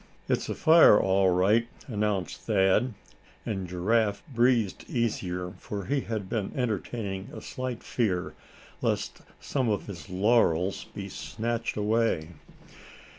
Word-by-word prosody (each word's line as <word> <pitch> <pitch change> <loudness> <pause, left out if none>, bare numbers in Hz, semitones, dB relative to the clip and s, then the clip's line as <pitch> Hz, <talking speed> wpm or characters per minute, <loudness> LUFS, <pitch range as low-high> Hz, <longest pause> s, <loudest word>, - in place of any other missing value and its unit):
"It's - - 0
a - - -2
fire, 160 -9 +7
all 95 0 +3
right," 100 +6 +3 0.2
announced 105 - -2
Thad; 100 +5 +2 0.5
and 95 -4 -3
Giraffe 100 +4 +1
breathed 120 -4 +2
easier, 90 -7 -2
for 100 -2 -5
he 140 0 0
had 110 -5 -4
been 105 -2 -2
entertaining 105 -4 -3
a - - -7
slight 130 -2 -5
fear 95 -7 -1 0.5
lest - - -1 0.2
some 130 -5 -1
of 105 - -1
his 95 -4 -9
laurels 95 -2 +2
be 100 -1 -7
snatched 115 +4 -3
away. 105 -6 +1
105 Hz, 125 wpm, -28 LUFS, 95-115 Hz, 0.5 s, fire